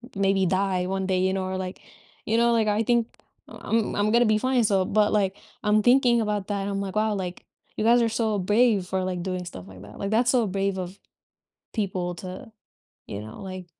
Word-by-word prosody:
maybe 195 -1 +2
die 185 0 0
one 190 0 -2
day, 185 -1 +1
you 190 +1 +1
know, 190 -1 -1
or 190 - -3
like, 185 0 -6 0.4
you 225 +1 +1
know, 235 0 +4
like, 220 -2 +2
I 210 +2 +1
think, 235 0 +2 0.4
I'm 225 -1 -2
I'm 210 +1 +2
gonna 240 0 +5
be 215 - +4
fine, 255 0 +1
so 195 -3 +2
but, 210 +1 +2
like, 200 -2 +1 0.3
I'm 210 0 +3
thinking 245 -2 +4
about 210 -2 -2
that, 200 -1 -2
I'm 195 0 -2
like, 195 0 -5
"Wow, 215 -1 +1
like, 180 -2 -5 0.3
you 215 - -2
guys 240 +1 +5
are 230 - +2
so 220 -3 0
brave 210 0 +3
for, 190 0 -1
like, 180 -1 -3
doing 185 -1 -3
stuff 95 - -9
like 95 -1 -12
that." 100 +1 -12
Like, 200 +1 -3
that's 240 +2 +3
so 240 -5 +2
brave 195 0 -1
of 185 +2 -6 0.8
people 185 -5 -2
to, 185 +6 -8 0.6
you 100 - -6
know, 110 - -10
like, 185 -2 -7
200 Hz, 220 wpm, -25 LUFS, 185-220 Hz, 0.8 s, gonna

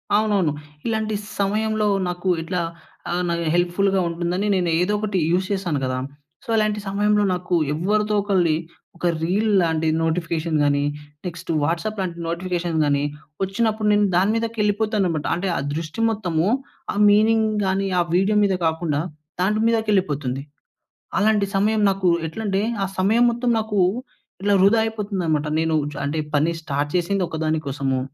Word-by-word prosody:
అవునవును. 205 -6 +2 0.4
ఇలాంటి 220 -1 -1 0.2
సమయంలో, 215 +1 +1 0.2
నాకు 180 +1 -5
ఇట్లా 175 +2 -2 0.5
ఆహ్, 180 +1 0
నాకు 170 0 -1
హెల్ప్‌ఫుల్‌గా 190 +2 +2
ఉంటుందని 175 +4 -1
నేను 180 -2 +1
ఏదొకటి 205 +2 0
యూస్ 185 +2 +2
చేస్తాను 185 -7 -1
కదా! 130 0 -1 0.5
సో, - - -16
అలాంటి 215 -1 +1
సమయంలో 210 +1 +2
నాకు 180 0 -1 0.2
ఎవ్వ‌రిదో 210 +6 0
ఒకళ్ళది 180 -6 +2 0.4
ఒక 175 - -5 0.2
రీల్‌లాంటి 180 -4 +2 0.2
నోటిఫికేషన్ 165 -1 -1
గానీ, 145 0 +2 0.4
టెక్స్ట్ 170 -2 -7
వాట్సాప్‌లాంటి 175 +2 -2
నోటిఫికేషన్ 170 -1 -2
గానీ 145 -1 +1 0.4
ఒచ్చినప్పుడు 215 +2 0
నేను 205 0 +4
దాని 190 +4 +3
మీదకెళ్ళిపోతానమాట. 210 -6 0
అంటే, 185 +2 -2
ఆ - - 0 0.2
దృష్టి 165 +6 -4
మొత్తము, 180 -6 0 0.5
ఆ - - -7
మీనింగ్ 220 +1 +4 0.2
గానీ, 195 +1 0
ఆ - - +5
వీడియో 200 +3 +3
మీద 195 - +2
కాకుండా, 160 -2 0 0.4
దాని 210 +4 +1
మీదకెళ్ళిపోతుంది. 170 - 0 0.8
అలాంటి 210 0 +3
సమయం 210 +2 +2
నాకు 190 -1 -1 0.2
ఎట్లంటే, 200 +2 -2 0.2
ఆ - - -3
సమయం 220 +6 +4
మొత్తం 240 +1 0
నాకు 215 -2 -1 0.6
ఇట్లా 205 0 +3
వృధా 200 +4 +5
అయిపోతుందన‌మాట. 190 -9 -1
నేనూ 160 -1 +1 0.2
చ్ - - -9
అంటే, 155 +2 -1
పని 155 +4 +2
స్టార్ట్ 145 0 -2
చేసింది 185 +2 0
ఒక - - -5
దాని 155 0 0
కోసము 135 -1 -1
190 Hz, 140 wpm, -22 LUFS, 165-210 Hz, 0.8 s, ఆ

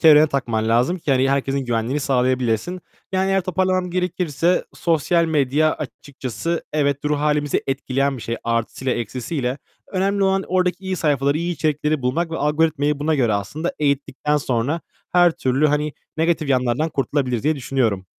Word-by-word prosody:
çevrene 155 -1 +7
takman 120 -6 -1
lazım 125 +11 +2
ki 155 - -3
hani 130 +1 +3
herkesin 135 0 0
güvenliğini 120 +4 -1
sağlayabilesin. 130 +4 0 0.3
Yani 190 +1 +1
eğer 195 0 +3
toparlamam 185 0 0
gerekirse, 180 -2 0
sosyal 170 +1 +2
medya 155 0 +2
açıkçası 145 +2 -5
evet, 140 -2 +1
ruh 150 0 +1
hâlimizi 150 -1 +1
etkileyen 135 0 0
bir 120 - -8
şey 115 - -3
artısıyla, 115 +2 -1
eksisiyle. 125 +3 -3 0.3
Önemli 195 +1 +1
olan 195 0 +2
oradaki 185 +1 0
iyi 190 0 -2
sayfaları, 145 -2 +1
iyi 170 +1 -1
içerikleri 150 -2 0
bulmak 160 +7 0
ve 165 - -3
algoritmayı 150 -1 +1
buna 155 +2 +1
göre 120 -6 +2
aslında 105 - -2
eğittikten 145 0 0
sonra 135 +3 -1 0.3
her 175 -1 +6
türlü 135 -1 +1
hani 150 0 0 0.2
negatif 160 -2 +1
yanlardan 130 +3 +1
kurtulabiliriz 135 -4 -1
diye 155 +1 +1
düşünüyorum. 115 -8 -1
145 Hz, 150 wpm, -21 LUFS, 130-165 Hz, 0.3 s, çevrene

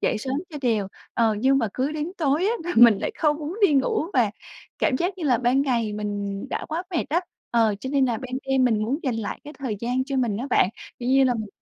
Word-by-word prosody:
dậy 220 - +1
sớm 260 +4 -3 0.2
cho 305 - -7
đều. 220 -6 +1 0.3
Ờ, 225 -2 +3
nhưng 265 +4 +3
mà 230 -4 0
cứ 270 +4 -1
đến 310 +3 -3
tối 305 +1 +1
á 440 - +2
là 350 - -2
mình 230 -3 +8
lại - - -2
không 300 -2 +2
muốn 315 +5 -5
đi 305 - +1
ngủ, 275 +3 +1
và 230 -5 +3 0.5
cảm 255 - +2
giác 365 +6 -2
như 340 - -4
là 250 -5 +3
ban 255 +3 +2
ngày 235 -6 0
mình 205 -1 -4
đã - - -3
quá 320 +3 -2
mệt 335 - 0
á, 330 +4 +2 0.3
ờ, 225 -3 +3
cho 260 - -5
nên 275 -2 +3
là 240 -3 0
ban 255 -1 -8
đêm 265 -1 +3
mình 220 -4 +2
muốn 250 +7 -1
dành 260 -5 -1
lại 225 -2 -4
cái 295 - -9
thời 245 -7 -3
gian 250 +2 0
cho 275 0 -3
mình 240 -6 +1
á 245 +5 -4
bạn. 185 - +4 0.3
Kiểu 245 0 -3
như 270 +1 +5
là 250 -1 +2
mình 220 -2 -4
255 Hz, 265 wpm, -24 LUFS, 225-285 Hz, 0.5 s, mình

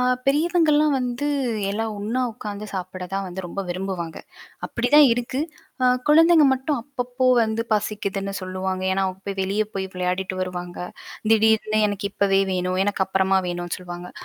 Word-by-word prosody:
அ - - +2 0.2
பெரியவங்கள்லாம் 305 0 +3
வந்து 250 +3 -2 0.4
எல்லா 220 +2 -1
ஒண்ணா 220 +5 -2
உட்காந்து 210 -2 -6
சாப்பிட 185 -1 -5
தான் 195 0 -1
வந்து 185 +1 -5
ரொம்ப 195 +3 -5
விரும்புவாங்க. 180 -2 -4 0.5
அப்பிடிதான் 275 +5 +5
இருக்கு. 245 +3 -2 0.4
அ - - +5 0.2
குழந்தைங்க 325 +1 +7
மட்டும் 265 +1 -1
அப்பப்போ 255 -1 -2 0.2
வந்து 220 +1 0
பசிக்குதுன்னு 200 -2 -1
சொல்லுவாங்க. 185 0 -3
ஏன்னா, 195 0 +1
அவுங்க 185 0 -5
போய் 195 -1 -4
வெளிய 200 +3 +1
போய் 190 -1 -2
விளையாடிட்டு 185 +1 -2
வருவாங்க. 180 -1 -5 0.5
திடீர்னு 220 0 +3
எனக்கு 200 0 -3
இப்பவே 195 -1 +2
வேணும். 185 0 -1
எனக்கு 200 -2 +1
அப்பறமா 190 0 +2
வேணும்ன்னு 175 -1 -3
சொல்லுவாங்க. 175 0 -8
200 Hz, 145 wpm, -23 LUFS, 185-245 Hz, 0.5 s, குழந்தைங்க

